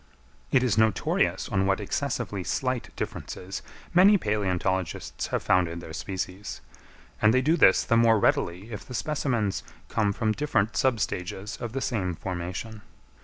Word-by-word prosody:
It 130 -2 +4
is 110 -4 +2
notorious 110 -1 +2
on 95 0 +1
what 95 +1 +2
excessively 105 -3 -2
slight 130 +4 -1
differences 95 +2 -5 0.3
many 195 +4 +7
palæontologists 95 - -1
have - - -2
founded 85 -2 +2
their 80 -2 -9
species; 95 +2 -5 0.6
and 110 - +6
they 130 +2 +3
do 155 +5 +4
this 95 - +5
the 115 - +2
more 115 -1 +5
readily 95 +1 0
if 105 - -6
the 125 - -8
specimens 120 -7 -1 0.3
come 105 -3 +1
from 110 +1 0
different 110 -4 0
sub 130 -4 +2
stages 95 +2 -3
of 120 -2 -4
the 135 - -2
same 95 -9 -1
formation. 95 +5 -5
105 Hz, 150 wpm, -27 LUFS, 95-120 Hz, 0.6 s, many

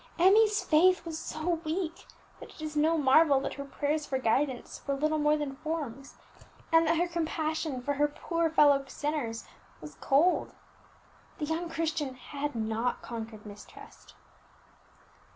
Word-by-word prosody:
Emmie's 415 +4 +5
faith 345 +2 +4
was 320 -1 -5
so 325 +1 -2
weak, 335 +2 -4 0.3
that - - -11
it - - -16
is 310 -1 -5
no 315 +2 +3
marvel 285 0 +5
that - - -4
her 280 - -6
prayers 290 +2 -2
for 270 -2 -2
guidance 260 +1 -1
were 280 - 0
little 305 +2 0
more 300 0 +3
than 280 -2 -4
forms, 295 -4 -5 0.6
and 325 0 +5
that 330 +1 +2
her 350 +2 +1
compassion 315 -5 -2
for 285 - 0
her 295 +1 +2
poor 330 +3 -1
fellow 290 -3 +5
sinners 280 -7 -3 0.3
was 150 0 -10
cold. 310 +7 +2 0.8
The 300 - -2
young 325 +3 -3
Christian 315 -5 -2
had 285 +2 -5
not 225 +2 -2
conquered 225 -2 -7
mistrust. 205 -1 -13
300 Hz, 150 wpm, -29 LUFS, 270-325 Hz, 0.8 s, Emmie's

